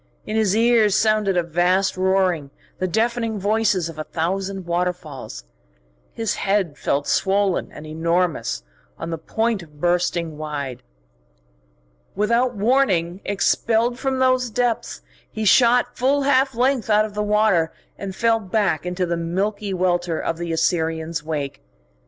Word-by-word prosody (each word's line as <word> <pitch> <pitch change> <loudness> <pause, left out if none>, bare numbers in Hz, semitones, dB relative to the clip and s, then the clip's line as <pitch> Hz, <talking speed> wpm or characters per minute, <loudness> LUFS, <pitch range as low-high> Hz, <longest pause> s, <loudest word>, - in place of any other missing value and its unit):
In 215 - -4
his 215 -3 +2
ears 225 -3 +4
sounded 215 -3 +2
a 175 - +2
vast 175 +3 +1
roaring, 185 -5 +1 0.3
the 185 - 0
deafening 230 +2 0
voices 205 -3 +1
of 165 -2 -9
a - - -2
thousand 190 +4 -3
waterfalls. 170 - -3 0.7
His 225 -2 -2
head 195 -6 0
felt 145 0 -1
swollen 195 -1 +1
and 150 - -10
enormous, 165 - -1 0.3
on 170 - -5
the 165 - -3
point 220 +5 -1
of 150 -3 -16
bursting 175 -2 0
wide. 140 -5 -5 1.3
Without 235 +4 +1
warning 200 -6 +1
expelled 230 +4 +1
from 265 -1 -1
those 255 -1 +2
depths, 230 - -1 0.3
he 220 - -3
shot 240 +4 +4
full 275 +3 +2
half 270 -1 +2
length 250 -1 +1
out 210 0 +4
of 210 -1 -9
water, 210 -5 +2 0.2
and 195 -1 -6
fell 230 +1 +2
back 190 -5 0
into 180 +1 -1
the 170 -1 -2
milky 200 +5 -2
welter 175 -2 0
of 165 - -3
the 170 -1 -3
Assyrian's 160 -1 -1
wake. 150 -3 -4
190 Hz, 140 wpm, -22 LUFS, 170-220 Hz, 1.3 s, ears